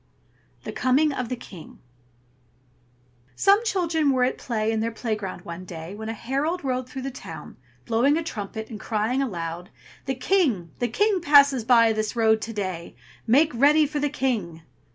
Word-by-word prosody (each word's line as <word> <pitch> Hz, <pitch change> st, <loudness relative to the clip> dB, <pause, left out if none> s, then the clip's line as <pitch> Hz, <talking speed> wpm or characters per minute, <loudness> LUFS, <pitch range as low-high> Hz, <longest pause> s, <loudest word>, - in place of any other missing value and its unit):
THE -, -, -5 dB
COMING 280 Hz, +4 st, +2 dB
OF 250 Hz, -3 st, -4 dB
THE 250 Hz, -, -2 dB
KING 180 Hz, -8 st, -12 dB, 1.6 s
Some 405 Hz, +3 st, +4 dB
children 335 Hz, -8 st, +1 dB
were 260 Hz, -2 st, +2 dB
at 255 Hz, -, 0 dB
play 220 Hz, -3 st, -1 dB
in 220 Hz, -, -1 dB
their 225 Hz, +1 st, 0 dB
play 230 Hz, 0 st, -3 dB
ground 190 Hz, -4 st, -7 dB
one 170 Hz, +2 st, -7 dB
day, 170 Hz, 0 st, -8 dB
when 220 Hz, +1 st, -6 dB
a -, -, -2 dB
herald 285 Hz, +10 st, -2 dB
rode 255 Hz, -1 st, -2 dB
through 265 Hz, -3 st, -6 dB
the 270 Hz, -, -4 dB
town, 260 Hz, -, -10 dB, 0.3 s
blowing 245 Hz, +6 st, +2 dB
a 330 Hz, -, -2 dB
trumpet, 220 Hz, -4 st, -6 dB
and 215 Hz, -, -7 dB
crying 225 Hz, +4 st, -1 dB
aloud, 175 Hz, -6 st, -4 dB, 0.4 s
"The 265 Hz, -, -2 dB
King! 255 Hz, -, +1 dB
the 245 Hz, -, +1 dB
King 400 Hz, -, +1 dB
passes 280 Hz, -5 st, +5 dB
by 230 Hz, -1 st, +5 dB
this 215 Hz, +1 st, -2 dB
road 220 Hz, -1 st, +3 dB
to 225 Hz, -, -5 dB
day. 185 Hz, -5 st, -5 dB, 0.3 s
Make 285 Hz, +7 st, +4 dB
ready 295 Hz, +5 st, +5 dB
for 295 Hz, +1 st, -3 dB
the 290 Hz, 0 st, 0 dB
King!" 210 Hz, -, -2 dB
245 Hz, 175 wpm, -24 LUFS, 215-285 Hz, 1.6 s, passes